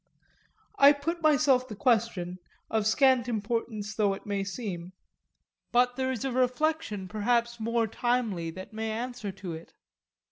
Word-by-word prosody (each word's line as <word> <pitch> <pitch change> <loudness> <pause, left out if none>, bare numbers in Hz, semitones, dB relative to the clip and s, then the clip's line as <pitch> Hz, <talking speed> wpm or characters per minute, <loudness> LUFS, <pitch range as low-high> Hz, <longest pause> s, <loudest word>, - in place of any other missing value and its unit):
I 280 +1 +9
put 330 +4 -3
myself 280 -4 +4
the 215 - -7
question, 200 -7 0 0.3
of 220 -1 +1
scant 260 0 +4
importance 220 -1 -2
though 205 -3 +1
it - - -13
may 200 -1 -1
seem; 190 -4 -5 0.8
but 245 0 +3
there 260 0 -1
is 255 -1 -3
a 270 - -1
reflection 250 -4 0
perhaps 235 +3 0
more 230 +1 +1
timely 220 -7 -1
than 185 +3 -8
any 220 0 -3
answer 230 -1 -4
to 190 -2 -7
it. 160 +1 -10
230 Hz, 145 wpm, -28 LUFS, 205-250 Hz, 0.8 s, I